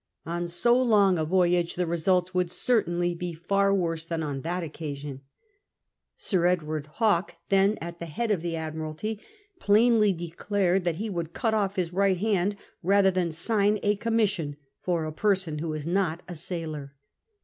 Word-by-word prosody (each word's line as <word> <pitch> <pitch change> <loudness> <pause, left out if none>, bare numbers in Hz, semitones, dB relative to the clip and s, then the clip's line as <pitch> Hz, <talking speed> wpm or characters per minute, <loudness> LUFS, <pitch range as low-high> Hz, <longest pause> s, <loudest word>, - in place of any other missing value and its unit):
On 175 +1 -2
so 235 +8 +3
long 200 -7 +4
a 155 - 0
voyage 175 0 +2
the 180 - 0
results 175 +2 +1
would 180 -1 +1
certainly 175 -6 +1
be 175 0 -4
far 195 +4 +1
worse 165 -4 0
than 165 -1 -3
on 140 -3 -3
that 175 +4 -2
occasion. 145 -3 -6 1.0
Sir 175 -4 +2
Edward 155 -4 -1
Hawke, 205 -6 +2
then 195 +2 +3
at 170 +1 -7
the 170 - -5
head 215 +9 -2
of 190 -6 +1
the 170 -1 -2
Admimlty, 160 +6 -4 0.4
plainly 215 - +4
declared 180 +2 -1
that 170 -2 +1
he 215 +6 -3
would 170 -2 -4
cut 225 +4 0
off 200 -2 0
his 175 -2 -2
right 195 0 +2
hand 205 0 +1 0.3
rather 195 +1 +4
than 180 -2 0
sign 205 +5 +2
a 205 0 +3
com 225 +2 -2
mission 190 -10 0 0.2
for 170 -3 -1
a 155 - -4
person 185 -5 0
who 165 +1 -3
was 155 -1 -4
not 175 -1 0
a 175 - -6
sailor. 155 -4 -5
175 Hz, 170 wpm, -27 LUFS, 165-200 Hz, 1.0 s, long